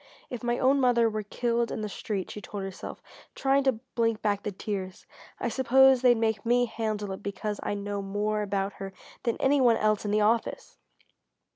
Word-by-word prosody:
"If 245 - -5
my 240 0 0
own 270 +2 +3
mother 240 -2 +4
were 215 -1 -2
killed 235 +2 -1
in - - -3
the 215 - -2
street," 200 -2 -4
she 210 - -7
told 200 -1 -6
herself, 195 -1 -7 0.3
trying 275 +1 +2
to 260 -5 +2
blink 230 -2 0
back 205 -2 +1
the 210 - -3
tears, 190 -2 -5 0.3
"I - - -1
suppose 260 +2 +5
they'd 245 -2 +5
make 220 -1 0
me 245 +1 +3
handle 215 -3 -3
it 190 - -6
because 205 +1 -4
I - - -2
know 200 0 -3
more 205 +2 -1
about 195 -1 -1
her 195 0 -5 0.3
than 235 - -1
any 275 +1 +3
one 235 -3 +5
else 215 -1 +1
in 210 - -2
the 210 +1 +2
office!" 225 +2 0
215 Hz, 195 wpm, -28 LUFS, 205-240 Hz, 0.3 s, suppose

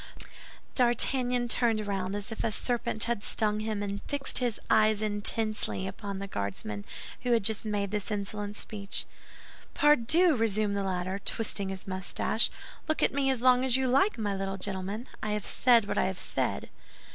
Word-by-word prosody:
D'Artagnan 245 0 +2
turned 225 -3 +1
round 195 -1 -2
as 205 +2 -5
if 225 - -4
a 225 - +1
serpent 225 -1 -1
had 235 -3 -1
stung 210 -1 +1
him, 215 -1 -2
and 200 0 -3
fixed 285 -2 0
his 245 -3 -1
eyes 215 -1 +4
intensely 215 -1 -1
upon 200 0 -5
the 195 - -4
Guardsman 100 - -4 0.4
who 245 -1 +1
had 230 - +3
just 220 +1 -1
made 205 -2 -1
this 210 0 -2
insolent 205 0 -4
speech. 200 -2 -3 0.7
"Pardieu," 300 +4 +4
resumed 215 -3 +1
the 200 - 0
latter, 185 0 -2
twisting 200 -2 -1
his 190 -1 -6
mustache, 190 +4 0 0.4
"look 310 - 0
at - - +3
me 275 -1 +1
as 255 -2 0
long 255 0 +5
as 260 -1 +3
you 265 -1 +1
like, 275 +10 +3
my 210 -3 -1
little 195 0 -3
gentleman! 195 +4 -3
I 215 -1 -1
have 210 -1 -2
said 235 -4 +4
what - - 0
I - - +3
have 190 0 -2
said." - - -2
215 Hz, 175 wpm, -29 LUFS, 200-240 Hz, 0.7 s, long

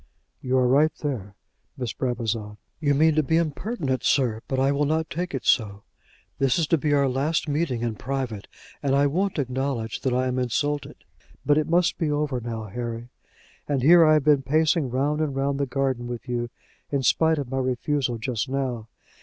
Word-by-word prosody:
"You 130 0 0
are 125 -1 +3
right 145 +5 +4
there, 105 -9 -4 0.4
Miss 125 -3 -3
Brabazon." 115 -4 -3 0.2
"You 145 -3 +2
mean 160 +2 +4
to 155 - +3
be 160 +3 +1
impertinent, 155 - -2
sir; 120 -5 +2
but 135 - -2
I 135 +1 +3
will 145 +1 +1
not 160 +2 -1
take 175 +2 -3
it 130 - -5
so. 100 -4 +1 0.6
This 135 -2 +2
is 165 - +2
to 165 - +4
be 150 +1 0
our 140 -1 +3
last 140 +6 0
meeting 145 -5 -1
in 115 -2 -1
private, 125 -3 -4 0.3
and 135 -1 +1
I 140 +1 +4
won't 180 +7 0
acknowledge 130 -3 -2
that 130 - 0
I 125 +1 +1
am 130 0 -1
insulted. 145 +4 -1 0.5
But 145 +1 +4
it 155 +1 -2
must 175 +1 +2
be 160 -3 0
over 145 -4 -1
now, 115 -1 -5
Harry; 115 +2 -5 0.6
and 140 -3 0
here 170 +4 +8
I 155 -1 +6
have 155 -2 +3
been 145 -2 +4
pacing 155 +1 +2
round 145 +5 0
and 145 -3 -1
round 140 +1 -1
the 140 - 0
garden 130 -2 -1
with 120 +2 -6
you, 120 -1 -2 0.4
in 140 -2 0
spite 160 +4 +3
of 135 -3 -4
my 135 - -1
refusal 130 0 -1
just 120 +2 -3
now. 130 -5 -2
135 Hz, 195 wpm, -25 LUFS, 125-150 Hz, 0.6 s, here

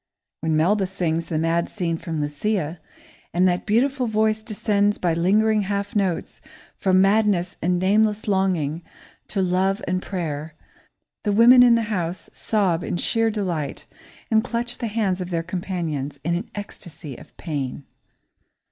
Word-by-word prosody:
When 160 0 0
Melba 190 +5 +2
sings 170 -3 -2
the 160 - -1
mad 165 +2 +1
scene 175 -5 -2
from 160 -2 -4
Lucia, 160 +2 -2 0.6
and 180 +1 +4
that 180 +2 -1
beautiful 255 +4 +2
voice 220 0 +1
descends 205 -1 0
by 175 -2 0
lingering 210 +6 +3
half 200 +1 -3
notes 190 -5 -1 0.3
from 185 -1 +3
madness 200 -2 +2
and 180 +2 +1
nameless 210 +3 +2
longing 180 -6 0 0.5
to 195 -2 -1
love 190 +2 +1
and 185 +1 0
prayer, 155 -5 -4 0.7
the 210 - +1
women 235 +4 +7
in 245 -1 +7
the 230 - +1
house 175 -1 -3
sob 185 -6 0
in - - -2
sheer 225 +4 +1
delight 180 -9 -3 0.5
and 220 0 +4
clutch 240 0 -3
the 235 - -2
hands 205 -4 -1
of 180 - -4
their 165 -2 -1
companions 165 -6 -4
in 170 - 0
an 180 +7 -4
ecstasy 170 -8 -8
of - - -15
pain. 145 -4 -4
185 Hz, 150 wpm, -23 LUFS, 165-210 Hz, 0.7 s, women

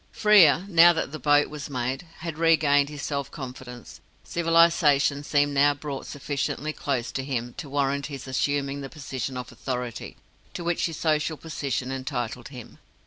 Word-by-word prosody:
Frere 190 -6 +5
now 175 -2 +7
that 160 -4 -3
the 155 - -6
boat 145 0 +3
was 150 -2 -7
made 130 +4 -3
had 160 -2 -5
regained 145 -4 +4
his 145 -2 -8
self 140 -1 -3
confidence. 125 -3 -9 0.2
Civilization 165 -4 +3
seemed 145 -1 +1
now 145 +1 +4
brought 140 -2 -6
sufficiently 145 +1 -3
close 130 -6 -2
to 135 - -3
him 120 -3 -3
to 160 -6 -7
warrant 140 0 0
his 140 -3 -8
assuming 140 +1 -1
the 135 - -7
position 135 -4 -5
of 125 -2 -7
authority 125 -1 -5 0.4
to 175 - -4
which 170 0 0
his 165 -2 -6
social 155 0 0
position 140 -5 -3
entitled 125 -3 -4
him. 125 -4 -11
140 Hz, 160 wpm, -25 LUFS, 130-155 Hz, 0.4 s, now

